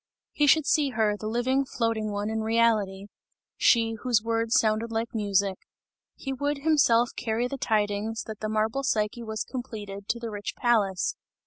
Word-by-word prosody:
He 295 - +2
should 310 +1 +5
see 295 -2 +2
her, 220 -4 +1
the 215 +1 -6
living, 250 +4 +1
floating 230 -4 -1
one, 205 +1 -2
in 220 0 -1
reality; 220 -4 +1 0.5
she, 225 -2 +3
whose 240 -4 +2
words 230 0 +2
sounded 220 +1 0
like 225 +1 -2
music. 200 -3 0 0.6
He 270 - -5
would 285 +1 -2
himself 245 -7 +4
carry 230 +2 -1
the 275 +2 -6
tidings, 215 0 0
that 220 -2 -8
the 215 - -3
marble 220 +5 0
Psyche 220 -3 -1
was 220 -2 -3
completed, 210 -6 -7
to 235 - -1
the 230 -1 -5
rich 205 -1 -5
palace. 205 -7 +1
225 Hz, 165 wpm, -27 LUFS, 210-240 Hz, 0.6 s, should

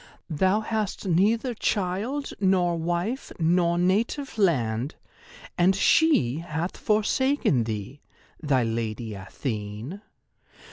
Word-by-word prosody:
Thou 190 +7 +2
hast 215 -2 -3
neither 215 +8 +2
child 215 +7 -2
nor 185 -3 +2
wife 175 +10 -2
nor 170 +1 +2
native 215 +10 0
land, 130 - +1 0.6
and 185 +2 +4
she 195 - +3
hath 165 +1 -4
forsaken 215 - +1
thee—thy 125 +5 -3
Lady 115 -1 -3
Athene. 105 - -5
175 Hz, 90 wpm, -26 LUFS, 130-210 Hz, 0.6 s, and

